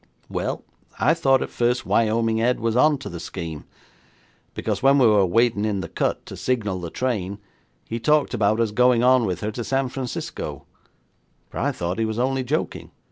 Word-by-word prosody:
Well, -, -, -3 dB, 0.4 s
I -, -, +4 dB
thought 135 Hz, -1 st, +3 dB
at -, -, -7 dB
first 120 Hz, +1 st, 0 dB
Wyoming 115 Hz, 0 st, +2 dB
Ed 125 Hz, +2 st, +2 dB
was 115 Hz, 0 st, -1 dB
on 150 Hz, +4 st, +4 dB
to 135 Hz, -, -8 dB
the 85 Hz, -, -6 dB
scheme, 80 Hz, -4 st, -6 dB, 0.9 s
because -, -, -2 dB
when 135 Hz, +1 st, +5 dB
we 130 Hz, -, +5 dB
were 105 Hz, -4 st, +5 dB
waiting 115 Hz, +2 st, +2 dB
in 105 Hz, -3 st, 0 dB
the 85 Hz, -, -5 dB
cut -, -, -2 dB
to -, -, -8 dB
signal 105 Hz, -7 st, -1 dB
the 85 Hz, -1 st, -5 dB
train 100 Hz, -4 st, -2 dB, 0.5 s
he 115 Hz, -, -3 dB
talked 150 Hz, +4 st, +2 dB
about 110 Hz, -1 st, +2 dB
us 115 Hz, -2 st, +1 dB
going 125 Hz, +1 st, +3 dB
on 125 Hz, -2 st, +4 dB
with 90 Hz, -2 st, -3 dB
her 105 Hz, -, -2 dB
to 120 Hz, +2 st, -5 dB
San 135 Hz, +1 st, 0 dB
Francisco, 130 Hz, -1 st, -5 dB, 0.9 s
but -, -, -4 dB
I -, -, +1 dB
thought 90 Hz, +4 st, -3 dB
he 115 Hz, -, +2 dB
was 110 Hz, 0 st, -3 dB
only 130 Hz, +2 st, 0 dB
joking. 145 Hz, +5 st, -3 dB
115 Hz, 190 wpm, -23 LUFS, 105-125 Hz, 0.9 s, when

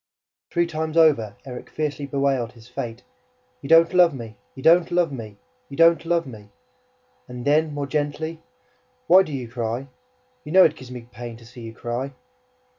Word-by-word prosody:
Three 170 Hz, -1 st, +1 dB
times 160 Hz, -1 st, -3 dB
over, 130 Hz, -11 st, +4 dB
Erik 125 Hz, -2 st, -8 dB
fiercely 145 Hz, -2 st, -3 dB
bewailed 135 Hz, -4 st, 0 dB
his 115 Hz, -1 st, -16 dB
fate: 120 Hz, -2 st, -6 dB, 0.6 s
"You 140 Hz, -, -8 dB
don't 165 Hz, +2 st, +6 dB
love 175 Hz, -5 st, +5 dB
me! 115 Hz, -4 st, -8 dB, 0.2 s
You 130 Hz, -, -10 dB
don't 170 Hz, +1 st, +5 dB
love 175 Hz, -3 st, +1 dB
me! 110 Hz, -6 st, -8 dB, 0.3 s
You 140 Hz, -, -9 dB
don't 165 Hz, 0 st, +5 dB
love 170 Hz, 0 st, +1 dB
me!" 105 Hz, -5 st, -11 dB, 0.8 s
And 125 Hz, -1 st, -8 dB
then, 155 Hz, +2 st, +3 dB
more 145 Hz, -1 st, -3 dB
gently: 155 Hz, +3 st, -3 dB, 0.6 s
"Why 185 Hz, +3 st, +7 dB
do 170 Hz, -, -4 dB
you 130 Hz, -4 st, -4 dB
cry? 120 Hz, +3 st, -4 dB, 0.5 s
You 150 Hz, -, -7 dB
know 190 Hz, 0 st, +8 dB
it 160 Hz, -, +2 dB
gives 130 Hz, -4 st, -12 dB
me 125 Hz, -1 st, -7 dB
pain 120 Hz, +1 st, -8 dB
to 115 Hz, -, -16 dB
see 120 Hz, +1 st, -13 dB
you 115 Hz, 0 st, -9 dB
cry!" 120 Hz, +4 st, -4 dB
140 Hz, 180 wpm, -23 LUFS, 120-160 Hz, 0.8 s, know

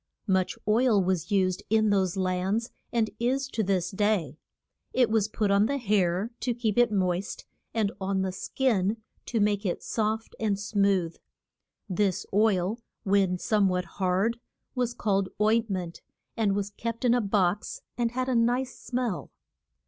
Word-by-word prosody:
Much 190 Hz, -3 st, +1 dB
oil 225 Hz, 0 st, +4 dB
was 185 Hz, -2 st, 0 dB
used 185 Hz, -3 st, +1 dB
in 215 Hz, -1 st, +3 dB
those 190 Hz, -2 st, +1 dB
lands, 190 Hz, +5 st, 0 dB, 0.2 s
and 225 Hz, -3 st, +1 dB
is 265 Hz, +3 st, 0 dB
to 230 Hz, -4 st, -2 dB
this 185 Hz, -3 st, 0 dB
day. 195 Hz, -8 st, 0 dB, 0.6 s
It 245 Hz, -4 st, +3 dB
was 220 Hz, -2 st, +2 dB
put 210 Hz, -2 st, 0 dB
on 200 Hz, +2 st, +4 dB
the 280 Hz, -, 0 dB
hair 205 Hz, -3 st, +1 dB
to 245 Hz, -2 st, -1 dB
keep 225 Hz, -4 st, -1 dB
it 240 Hz, -2 st, +4 dB
moist, 185 Hz, -1 st, -1 dB, 0.3 s
and 215 Hz, -3 st, 0 dB
on 190 Hz, 0 st, 0 dB
the 190 Hz, -, -1 dB
skin 215 Hz, 0 st, 0 dB, 0.3 s
to 230 Hz, -, 0 dB
make 205 Hz, 0 st, +2 dB
it 180 Hz, -4 st, -2 dB
soft 220 Hz, 0 st, -2 dB
and 205 Hz, -3 st, 0 dB
smooth. 200 Hz, -4 st, +1 dB, 0.7 s
This 195 Hz, 0 st, 0 dB
oil, 205 Hz, 0 st, +2 dB, 0.2 s
when 195 Hz, -3 st, +2 dB
some 205 Hz, +1 st, +2 dB
what 180 Hz, 0 st, -1 dB
hard, 190 Hz, +6 st, 0 dB, 0.3 s
was 245 Hz, -2 st, -1 dB
called 195 Hz, -4 st, 0 dB
oint 220 Hz, +2 st, +3 dB
ment, 180 Hz, -3 st, -4 dB, 0.3 s
and 210 Hz, -3 st, +1 dB
was 200 Hz, 0 st, -2 dB
kept 230 Hz, +4 st, -4 dB
in 240 Hz, -, +5 dB
a 245 Hz, -, +3 dB
box, 200 Hz, -1 st, 0 dB
and 235 Hz, -1 st, +1 dB
had 255 Hz, +2 st, -2 dB
a 260 Hz, -, +1 dB
nice 245 Hz, +2 st, +1 dB
smell. 245 Hz, -6 st, -3 dB
205 Hz, 160 wpm, -27 LUFS, 190-230 Hz, 0.7 s, in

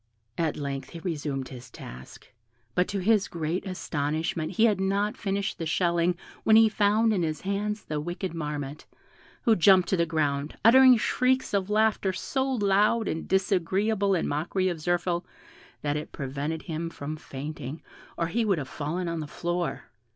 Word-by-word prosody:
At 160 Hz, 0 st, -1 dB
length 140 Hz, -2 st, -4 dB
he 170 Hz, -, -8 dB
resumed 145 Hz, -6 st, -3 dB
his 125 Hz, -1 st, -10 dB
task, 65 Hz, +2 st, -11 dB, 0.4 s
but 180 Hz, +5 st, +2 dB
to 205 Hz, -, -3 dB
his 210 Hz, +1 st, +3 dB
great 170 Hz, +3 st, -3 dB
astonishment 160 Hz, -1 st, -2 dB
he 220 Hz, +5 st, +4 dB
had 205 Hz, -4 st, +2 dB
not 200 Hz, +2 st, 0 dB
finished 200 Hz, 0 st, -2 dB
the 165 Hz, -, -2 dB
shelling 170 Hz, +1 st, +1 dB, 0.3 s
when 220 Hz, -, +5 dB
he 225 Hz, 0 st, +7 dB
found 215 Hz, +2 st, +3 dB
in 190 Hz, -, +1 dB
his 155 Hz, -2 st, -2 dB
hands 205 Hz, +1 st, -2 dB
the 150 Hz, -1 st, -3 dB
wicked 175 Hz, +3 st, -4 dB
Marmotte, 150 Hz, -3 st, -5 dB, 0.6 s
who 225 Hz, -, +5 dB
jumped 185 Hz, 0 st, +5 dB
to 190 Hz, -, +2 dB
the 170 Hz, 0 st, +2 dB
ground, 150 Hz, -2 st, -1 dB
uttering 255 Hz, +1 st, +8 dB
shrieks 255 Hz, +3 st, +1 dB
of 195 Hz, -1 st, 0 dB
laughter 215 Hz, -2 st, +2 dB
so 265 Hz, +7 st, -1 dB
loud 210 Hz, -1 st, +2 dB
and 160 Hz, -, -3 dB
disagreeable 195 Hz, +2 st, +1 dB
in 170 Hz, -, 0 dB
mockery 175 Hz, +6 st, 0 dB
of 170 Hz, -3 st, -4 dB
Zirphil, 175 Hz, +1 st, 0 dB, 0.6 s
that 145 Hz, 0 st, 0 dB
it 150 Hz, -, -6 dB
prevented 145 Hz, +3 st, -4 dB
him 165 Hz, -1 st, -4 dB
from 155 Hz, -1 st, -6 dB
fainting, 145 Hz, 0 st, -7 dB, 0.4 s
or 170 Hz, -, +1 dB
he 225 Hz, +8 st, 0 dB
would 200 Hz, -5 st, +2 dB
have 140 Hz, -4 st, -4 dB
fallen 165 Hz, +6 st, -3 dB
on 170 Hz, -1 st, -2 dB
the 155 Hz, -, -4 dB
floor. 175 Hz, +2 st, -3 dB
175 Hz, 170 wpm, -27 LUFS, 155-200 Hz, 0.6 s, uttering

